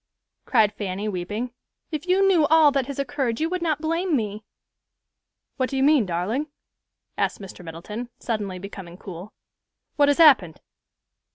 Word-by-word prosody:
cried 215 -5 +3
Fanny, 200 0 -4
weeping; 210 +6 -4 0.4
"if 305 +2 -4
you 385 +2 +4
knew 340 -6 +4
all 315 -1 +6
that 275 -2 0
has 280 - -6
occurred, 270 -4 -2
you 320 - +1
would 365 0 -2
not 315 -3 0
blame 330 +1 0
me." 215 -3 -3 1.1
"What 255 -1 0
do 270 - -3
you 265 - +2
mean, 285 -7 +4
darling?" 195 - -1 0.7
asked - - 0
Mr. 195 -2 -10
Middleton, 190 +9 -7
suddenly 205 -5 -3
becoming 185 -2 -9
cool. 185 +1 -9 0.7
"What 290 -1 +5
has 285 - +3
happened?" 255 - +5
240 Hz, 155 wpm, -24 LUFS, 200-300 Hz, 1.1 s, all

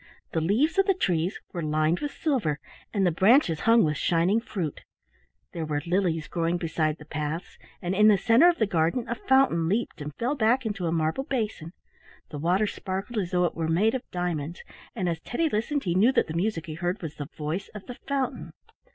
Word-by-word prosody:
The 160 - 0
leaves 240 - +2
of 390 - +4
the 390 - +3
tress 180 - 0 0.2
were 175 - -3
lined 155 +2 +1
with 290 - -2
silver, 225 - -1 0.3
and 200 -3 +1
the 175 - +3
branches 190 - +4
hung 230 0 +6
with 150 -2 0
shining 175 +7 +2
fruit. 175 -10 -4 0.7
There 165 - -4
were 150 -2 -2
lilies 170 -3 0
growing 170 0 0
beside 160 -2 -1
the 150 - -13
paths, 155 +3 -5 0.2
and 180 +1 -1
in 210 +2 +5
the 210 -2 +6
centre 230 - +5
of 345 - 0
the 220 - +2
garden 175 +5 0
a 235 - -1
fountain 240 -10 +2
leaped 210 -5 -1
and 150 +1 -5
fell 245 +5 -1
back 245 -1 +2
into 200 -5 -2
a - - 0
marble 165 +10 0
basin. 215 - -3 0.6
The 145 - -5
water 180 +7 +2
sparkled 195 +3 -4
as 180 -4 -2
though 180 -1 +2
it 170 - -1
were 165 -1 -2
made 195 +8 +2
of 260 - -1
diamonds, 175 -3 -3 0.3
and 190 -6 -1
as 165 -1 -1
Teddy 315 - -1
listened 280 +5 -1
he 175 - 0
knew 205 +8 +5
that - - +3
the 160 - -6
music 175 0 -1
he 160 - -6
heard 175 +5 -2
was 160 -1 -6
the 145 - -5
voice 160 +5 -3
of 205 - -8
the 245 - -9
fountain. 275 -2 -2
180 Hz, 210 wpm, -26 LUFS, 160-225 Hz, 0.7 s, hung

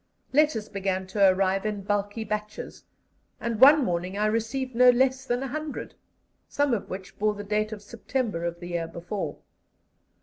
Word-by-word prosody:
Letters 285 -7 +3
began 190 -1 -2
to 195 +1 +4
arrive 190 +1 +1
in 210 -2 -3
bulky 205 +2 -1
batches, 210 0 -5 0.5
and 230 -2 -3
one 285 +1 +8
morning 180 +1 -2
I 210 - +1
received 230 +4 -1
no 250 +1 +7
less 260 +1 +3
than 245 0 -1
100, 300 +3 -5 0.6
some 285 -2 +1
of 215 - -2
which 190 0 -8
bore 210 0 +1
the 205 - -6
date 210 +1 -1
of 210 -1 -7
September 220 -3 -3
of 170 0 -3
the 175 0 -8
year 170 -1 -2
before. 175 +5 -5
210 Hz, 165 wpm, -26 LUFS, 195-245 Hz, 0.6 s, one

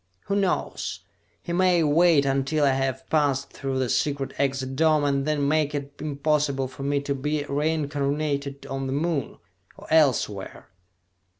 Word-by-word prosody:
Who 200 - -2
knows? 195 -3 -1 0.4
He 170 - -4
may 180 -1 +3
wait 155 -1 +4
until 135 +2 +1
I 140 - +4
have 135 -1 -2
passed 140 -3 +1
through 135 -1 -3
the 130 -1 0
secret 140 +2 -1
exit 135 -1 -1
dome, 155 0 +3
and 140 0 0
then 145 -2 +1
make 150 0 +1
it 140 0 -5
impossible 145 -2 0
for 130 +1 -11
me 140 +1 0
to 140 0 -2
be 150 +2 -2
reincarnated 145 -1 -1
on 135 0 -4
the 130 - -2
Moon 150 -2 -1 0.4
or - - -12
elsewhere!" 125 -10 +1
140 Hz, 155 wpm, -25 LUFS, 135-155 Hz, 0.4 s, wait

